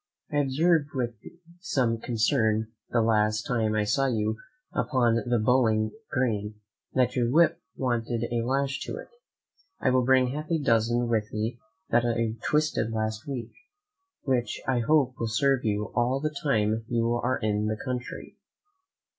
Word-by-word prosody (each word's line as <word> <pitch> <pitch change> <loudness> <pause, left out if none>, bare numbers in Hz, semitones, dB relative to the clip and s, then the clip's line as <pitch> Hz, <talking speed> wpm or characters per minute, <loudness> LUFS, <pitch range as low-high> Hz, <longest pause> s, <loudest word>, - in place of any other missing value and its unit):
I 145 - 0
observed 145 +2 +2
with 120 -2 -1 0.5
some 130 - 0
concern, 110 -1 +1 0.2
the 115 -2 +2
last 110 -1 +2
time 110 -3 0
I 105 - +2
saw 135 +7 +1
you 110 -3 0 0.4
upon 120 -5 +2
the 120 - +3
bowling 110 -2 +2 0.2
green, 110 -5 -1 0.4
that 125 -1 +2
your 120 -2 +1
whip 165 +4 +3
wanted 120 -2 -1
a 120 - +1
lash 135 +2 0
to - - -4
it; - - -9 0.7
I 130 - +2
will 130 0 +3
bring 130 0 +4
half 150 +4 -5
a 165 - +2
dozen 120 -3 +2
with 110 -2 0
me 110 +3 -3 0.3
that 120 +1 +4
I 115 -2 0
twisted 150 -7 +1
last 110 +4 -3
week, 130 -4 -5 0.7
which 130 -4 0
I 130 -2 +2
hope 130 0 +2
will 115 - -1
serve 135 +4 +2
you 105 -1 -1
all 125 +2 +1
the 155 +1 -2
time 110 -6 +1
you 115 0 +1
are 120 +2 0
in 105 -1 0
the 110 0 -1
country. 125 +1 -6
120 Hz, 155 wpm, -27 LUFS, 110-130 Hz, 0.7 s, bring